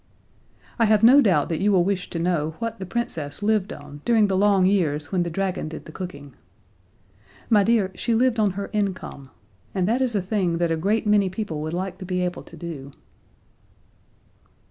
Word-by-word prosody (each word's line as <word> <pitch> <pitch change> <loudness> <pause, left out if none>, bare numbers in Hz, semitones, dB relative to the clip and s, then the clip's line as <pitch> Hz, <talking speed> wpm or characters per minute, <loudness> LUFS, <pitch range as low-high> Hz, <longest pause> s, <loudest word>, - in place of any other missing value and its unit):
I 230 - +5
have 215 0 +3
no 260 +5 +8
doubt 175 - +3
that 165 0 -2
you 205 +1 +3
will 185 -3 +4
wish 190 -1 -2
to - - -5
know 165 -2 -1
what 230 -3 -4
the 190 - -6
Princess 170 -8 -4
lived 215 -1 +1
on 145 0 -10
during 225 -3 +4
the 195 -2 0
long 195 -1 +4
years 155 -7 +1
when 185 -2 +1
the 175 - -1
dragon 185 -1 -2
did 160 - -8
the - - -10
cooking. 145 -6 -8 1.2
My 210 -2 +6
dear, 215 -3 +2
she 230 +4 -1
lived 240 0 +2
on 210 -2 +3
her 200 - -4
income 190 -9 -3 0.5
and 185 -2 +1
that 240 +4 +1
is 250 -4 0
a - - +3
thing 185 -4 0
that 170 -1 0
a - - +2
great 205 +8 0
many 205 -2 +3
people 185 -6 -4
would 155 +1 -4
like 185 +1 -4
to 185 - -7
be 180 0 -1
able 180 - -4
to - - -14
do. 145 -5 -7
190 Hz, 200 wpm, -24 LUFS, 165-210 Hz, 1.2 s, no